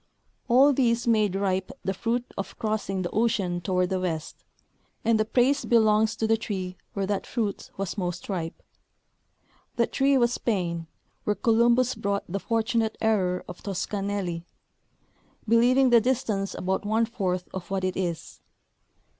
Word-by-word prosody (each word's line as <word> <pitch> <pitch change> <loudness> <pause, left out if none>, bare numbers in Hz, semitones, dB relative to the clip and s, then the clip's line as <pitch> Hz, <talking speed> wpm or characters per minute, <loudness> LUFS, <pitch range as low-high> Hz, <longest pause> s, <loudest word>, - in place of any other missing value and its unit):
All 265 +4 +6
these 235 -3 +1
made 215 -4 +3
ripe 190 -1 0 0.2
the 190 - 0
fruit 235 +5 -1
of 195 - -6
crossing 210 -3 -2
the 175 - -3
ocean 205 -6 0
toward 180 +1 0
the 190 - +1
west, 165 -4 -4 0.6
and 225 -1 +3
the 215 - +2
praise 255 +5 +2
belongs 220 -1 +3
to 225 - -1
the 225 0 +3
tree 190 -5 -4 0.2
where 200 -1 -1
that 200 0 -2
fruit 215 -5 -3
was 195 +1 -3
most 175 -1 -3
ripe. 170 -5 -4 1.1
That 235 - +1
tree 275 0 +3
was 240 -1 +3
Spain, 170 -9 -2 0.4
where 210 - 0
Columbus 235 +3 +3
brought 200 0 -2
the 195 +3 -3
fortunate 225 0 0
error 190 -5 +1
of 180 - -9
Toscanelli, 195 -3 -3 1.0
be 230 +2 +5
lieving 255 +2 +4
the 235 -1 +7
distance 220 -5 -1
about 190 +2 -1
one 220 +2 +2
fourth 185 -5 -2
of 190 -2 -6
what 195 -1 -1
it 185 0 -1
is. 170 -3 -4
205 Hz, 155 wpm, -26 LUFS, 185-230 Hz, 1.1 s, the